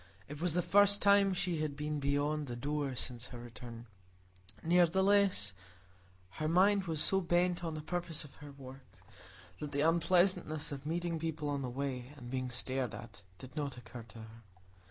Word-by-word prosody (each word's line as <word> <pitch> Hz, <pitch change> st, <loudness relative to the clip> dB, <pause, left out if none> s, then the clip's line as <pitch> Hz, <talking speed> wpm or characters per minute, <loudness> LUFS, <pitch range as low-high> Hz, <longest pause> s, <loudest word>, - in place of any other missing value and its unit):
It 145 Hz, +1 st, -8 dB
was 175 Hz, -2 st, +2 dB
the 180 Hz, -, +2 dB
first 205 Hz, 0 st, +6 dB
time 200 Hz, -1 st, +5 dB
she 180 Hz, -3 st, -1 dB
had 150 Hz, -2 st, -2 dB
been 150 Hz, +1 st, -3 dB
beyond 145 Hz, +1 st, 0 dB
the 120 Hz, -, -5 dB
door 140 Hz, +1 st, -2 dB
since 125 Hz, -1 st, -4 dB
her 125 Hz, -, -9 dB
return; 120 Hz, 0 st, -10 dB, 0.8 s
nevertheless 180 Hz, -, +3 dB, 0.9 s
her 155 Hz, -, +1 dB
mind 195 Hz, +4 st, +4 dB
was 160 Hz, -3 st, -1 dB
so 195 Hz, 0 st, +4 dB
bent 175 Hz, 0 st, +1 dB
on 165 Hz, -2 st, -3 dB
the 155 Hz, -, -6 dB
purpose 170 Hz, -1 st, -3 dB
of 145 Hz, -, -13 dB
her 145 Hz, -1 st, -9 dB
walk, 135 Hz, -1 st, -11 dB, 0.8 s
that 150 Hz, -1 st, -6 dB
the 140 Hz, -, +1 dB
unpleasantness 170 Hz, -1 st, +2 dB
of 140 Hz, +1 st, -6 dB
meeting 170 Hz, 0 st, -2 dB
people 155 Hz, -2 st, -3 dB
on 140 Hz, -1 st, -1 dB
the 130 Hz, -, -3 dB
way, 130 Hz, 0 st, -4 dB
and 120 Hz, -2 st, -9 dB
being 130 Hz, -1 st, -2 dB
stared 125 Hz, -2 st, -2 dB
at, 115 Hz, -4 st, -11 dB, 0.2 s
did 130 Hz, -1 st, -12 dB
not 145 Hz, -4 st, -3 dB
occur 120 Hz, +1 st, -9 dB
to 115 Hz, -, -13 dB
her. 110 Hz, +1 st, -13 dB
150 Hz, 175 wpm, -33 LUFS, 130-175 Hz, 0.9 s, first